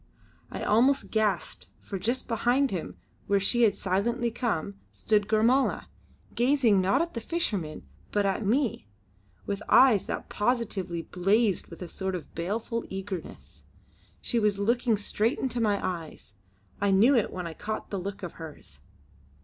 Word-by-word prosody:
I - - -5
almost 260 +6 +3
gasped, 215 -3 -1
for 195 - -6
just 240 +7 -1
behind 245 +4 +2
him, 180 -4 -5 0.3
where 200 0 +3
she 240 +5 +1
had 215 -4 +4
silently 230 +6 0
come, 200 -5 -2
stood 210 -2 +1
Gormala, 230 +5 +2 0.4
gazing 240 -5 +3
not 225 - +3
at 340 - -6
the 230 - -4
fisherman 205 - -2 0.3
but 205 -1 +1
at 195 +3 0
me, 230 - 0 0.6
with 200 0 -3
eyes 250 -7 +6
that - - -4
positively 205 -7 -1
blazed 195 +3 +1
with 170 +2 -9
a - - -6
sort 190 +2 -3
of 175 - -8
baleful 220 +7 -3
eagerness. 190 -2 -7 0.6
She 240 - 0
was 210 -2 +2
looking 230 +2 +1
straight 215 +4 0
into 245 -2 -2
my 205 -3 +2
eyes; 165 - -6 0.5
I 200 - +2
knew 215 +8 +5
it 230 - +1
when 180 -1 -5
I 165 - -5
caught 215 +6 -5
the 200 - -2
look 195 +2 -6
of 175 - -5
hers. 150 - -10
210 Hz, 155 wpm, -28 LUFS, 190-235 Hz, 0.6 s, eyes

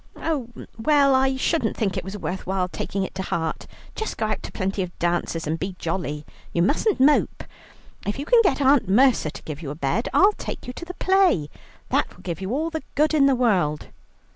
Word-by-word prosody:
"Oh, 285 -8 -2 0.3
well, 280 +2 +4
I 265 0 +3
shouldn't 260 -2 0
think 200 -5 0
it - - -3
was 195 +3 -6
worth 190 -2 -5
while 190 -1 0
taking 195 +2 -3
it - - -5
to 190 - -4
heart. 165 -3 -3 0.3
Just 440 - -4
go 220 - 0
out 215 -1 -2
to - - -8
plenty 195 +1 -2
of 180 -2 -5
dances 170 -1 -1
and 160 +2 -2
be 190 -1 -4
jolly; 160 -4 -3 0.3
you 170 - +2
mustn't 315 - +1
mope. 290 +3 +3 0.6
If 205 - -1
you 280 - -4
can 475 +7 +5
get 380 -8 +1
Aunt 265 -6 +4
Mercer 245 - +4
to - - -10
give 155 0 -7
you 150 - -5
a 145 - -5
bed, 145 - -1
I'll 400 +2 +5
take - - -7
you 250 - -6
to 340 - -8
the 360 +1 -8
play. 370 - +2 0.4
That - - 0
will - - -17
do 175 - -2
you 190 +2 -4
all 315 +6 -1
the 320 -1 -3
good 305 +2 +3
in 285 -3 +5
the 270 - +4
world." 185 -12 +1
215 Hz, 220 wpm, -24 LUFS, 175-285 Hz, 0.6 s, can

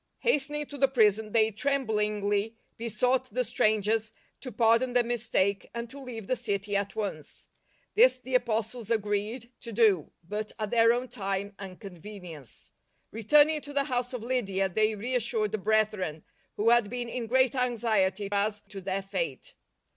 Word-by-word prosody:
Hasten 295 - +2
ing 295 0 -2
to 285 -1 -10
the 270 - +5
prison 220 -4 +2
they 220 0 +3
tremblingly 210 -4 0 0.2
besought 245 +3 0
the 250 +4 0
strangers 220 -1 +1 0.3
to 255 - -7
pardon 230 +2 +3
their 245 -1 +4
mistake, 220 -4 0
and 235 0 -4
to 280 +1 -9
leave 235 -5 -7
the 255 - 0
city 205 -4 -2
at 200 0 -1
once. 190 -9 -5 0.4
This - - +6
the 255 0 -9
Apostles 230 -2 0
agreed 220 +2 -1
to 230 - -8
do, 205 -8 +3 0.2
but 210 +2 -4
at 215 -2 -3
their 230 -1 +5
own 245 +2 -1
time 200 -3 -3
and 190 -2 -8
convenience. 180 - -9 0.4
Returning 295 +8 +4
to 285 0 -9
the 280 -1 +2
house 250 -3 -2
of 250 -3 -5
Lydia, 195 -6 0
they 215 +3 +1
reas 245 +4 -1
sured 215 -3 0
the 215 - -2
brethren, 200 -6 0 0.3
who 220 +3 +3
had 240 -3 +4
been 245 0 -4
in 235 0 -4
great 260 +2 +3
anxiety 220 -6 +1
as 205 +1 0
to 195 -2 -8
their 195 +1 -2
fate. 485 - -4
220 Hz, 165 wpm, -28 LUFS, 205-250 Hz, 0.4 s, This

